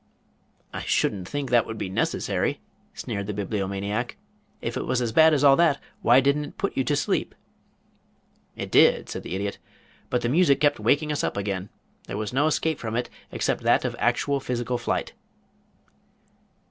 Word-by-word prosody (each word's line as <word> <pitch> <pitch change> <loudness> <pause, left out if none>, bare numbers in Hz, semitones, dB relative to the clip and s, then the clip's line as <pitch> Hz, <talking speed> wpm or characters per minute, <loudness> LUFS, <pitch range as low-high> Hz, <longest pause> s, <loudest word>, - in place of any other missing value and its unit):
"I - - -4
shouldn't 95 -3 0
think 145 -3 -3
that 120 -2 +4
would 110 - -6
be 100 - -3
necessary," 95 - -1 0.4
sneered 100 -1 -4
the 105 - -4
Bibliomaniac. 100 +3 -3 0.4
"If - - -4
it - - -3
was 130 - +1
as 120 -2 -1
bad 160 +6 +6
as 145 -2 +2
all 140 -1 +7
that 165 -4 +3 0.2
why 120 +3 +6
didn't 140 +2 +1
it - - -12
put 200 - -2
you 135 - +1
to 145 - +1
sleep?" 140 - -1 1.2
"It - - -6
did," - - +5
said - - -5
the 90 - -5
Idiot. 100 +1 -3 0.5
"But 125 - 0
the - - +1
music 150 0 +4
kept 145 -4 +2
waking 145 +8 +2
us 150 - -1
up - - -2
again. 100 -1 -3 0.4
There 100 - -4
was 105 +2 -4
no 145 +4 +3
escape 155 0 0
from 110 -1 -4
it 120 +1 -2 0.2
except - - -1
that - - +3
of - - -2
actual 140 -1 +1
physical 125 -1 -2
flight." 120 - -2
125 Hz, 180 wpm, -25 LUFS, 105-145 Hz, 1.2 s, all